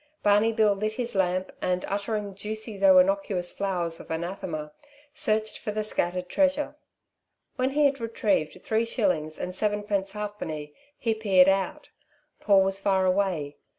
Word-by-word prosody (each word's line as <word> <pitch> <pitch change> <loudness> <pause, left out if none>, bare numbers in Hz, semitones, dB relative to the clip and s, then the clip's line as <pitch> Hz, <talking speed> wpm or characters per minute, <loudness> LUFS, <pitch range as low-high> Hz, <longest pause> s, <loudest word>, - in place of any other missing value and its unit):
Barney 210 +2 +4
Bill 215 -2 +3
lit 215 +2 -2
his 240 +1 -2
lamp, 185 -1 0
and, 180 0 0
uttering 205 0 -2
juicy 215 +2 -4
though 285 +7 +6
innocuous 275 -11 +2
flowers 175 -4 -2
of - - -12
anathema, 160 -2 -4 0.4
searched 220 -8 0
for - - -5
the 215 +1 -2
scattered 180 -3 -2
treasure. 285 +4 +1 0.8
When 255 0 +1
he 295 +2 +2
had 275 -1 +2
retrieved 205 -7 -1
three 225 +1 +1
shillings 180 -10 0
and 180 - -4
sevenpence 205 -1 -1
halfpenny 185 -8 -5 0.2
he 230 -2 0
peered 195 -4 +4
out. 195 0 -1 0.5
Paul 195 -3 +5
was 195 0 -1
far 190 -1 +2
away. 185 -6 0
200 Hz, 150 wpm, -26 LUFS, 185-220 Hz, 0.8 s, though